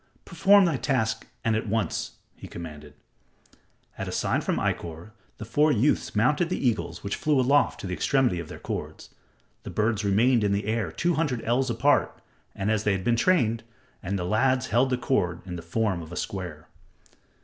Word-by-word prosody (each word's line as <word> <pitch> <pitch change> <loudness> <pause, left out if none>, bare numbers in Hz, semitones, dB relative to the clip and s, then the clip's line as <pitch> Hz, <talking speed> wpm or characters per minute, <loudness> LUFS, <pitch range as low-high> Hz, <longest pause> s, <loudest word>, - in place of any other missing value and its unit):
"Perform 195 +3 +5
thy 165 -6 +1
task 110 -5 -1 0.2
and 115 -1 +2
at 110 - -2
once," 110 0 -1 0.2
he - - -10
commanded. 75 -4 -9 1.0
At - - -3
a - - -4
sign - - 0
from - - -1
Ikkor, 85 +5 -3 0.3
the 110 - -7
four 145 +8 +3
youths 130 +1 +1
mounted 150 +10 +2
the - - -1
eagles 120 -5 -1
which 100 - -2
flew 150 -3 +1
aloft 140 +3 +3
to - - -6
the 90 - -3
extremity 125 - +1
of 85 - -6
their - - -8
cords. - - -6 0.5
The - - -8
birds 110 0 0
remained 110 +4 +3
in 100 -1 +2
the 100 0 -1
air 110 -5 -1
two 175 - 0
hundred 150 -7 -1
ells 125 +3 +1
apart, 125 +5 +2 0.4
as 105 +2 0
they 105 - +2
had 95 -1 -2
been 120 +2 +2
trained, 115 -6 +2 0.4
and 100 +3 -2
the 90 - -3
lads 130 +7 +1
held 125 +2 +2
cords 90 -9 0
in 90 -2 -6
the 85 - -6
form 95 +2 -1
of 80 0 -10
a - - -6
square. 90 -6 -5
110 Hz, 185 wpm, -26 LUFS, 95-130 Hz, 1.0 s, Perform